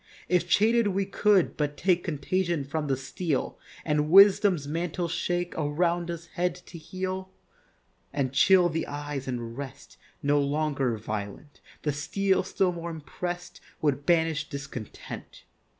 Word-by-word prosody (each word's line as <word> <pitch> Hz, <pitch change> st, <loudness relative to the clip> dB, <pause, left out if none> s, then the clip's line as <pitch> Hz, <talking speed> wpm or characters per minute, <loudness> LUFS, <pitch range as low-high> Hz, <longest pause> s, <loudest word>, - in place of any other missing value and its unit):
If 180 Hz, -1 st, +1 dB
chain'd 225 Hz, +3 st, +4 dB
we 195 Hz, 0 st, +1 dB
could 200 Hz, -1 st, +3 dB
but 145 Hz, -1 st, -1 dB
take 180 Hz, -2 st, +2 dB
Contagion 170 Hz, +1 st, -1 dB
from 150 Hz, +2 st, -3 dB
the 135 Hz, -2 st, +1 dB
steel, 145 Hz, +2 st, -3 dB, 0.3 s
And 150 Hz, -1 st, +1 dB
wisdom's 195 Hz, -4 st, +6 dB
mantle 170 Hz, +3 st, -2 dB
shake 175 Hz, +1 st, -1 dB
Around 170 Hz, +3 st, 0 dB
us 170 Hz, -1 st, -5 dB
head 175 Hz, 0 st, -1 dB
to 180 Hz, -1 st, -12 dB
heel, 185 Hz, +3 st, -4 dB, 0.8 s
And 135 Hz, -2 st, -1 dB
chill 180 Hz, +5 st, +6 dB
the 165 Hz, -1 st, -2 dB
eyes 145 Hz, -2 st, -5 dB
and 120 Hz, -2 st, -4 dB
rest 140 Hz, -1 st, -9 dB, 0.3 s
No 145 Hz, 0 st, +3 dB
longer 140 Hz, -4 st, 0 dB
violent, 105 Hz, +6 st, -6 dB, 0.2 s
The 150 Hz, -, 0 dB
steel, 190 Hz, +7 st, +1 dB
still 190 Hz, 0 st, +1 dB
more 170 Hz, -1 st, -5 dB
imprest, 175 Hz, +3 st, -6 dB, 0.2 s
Would 145 Hz, -2 st, 0 dB
banish 160 Hz, -3 st, +2 dB
discontent. 140 Hz, -7 st, -8 dB
160 Hz, 135 wpm, -27 LUFS, 145-180 Hz, 0.8 s, wisdom's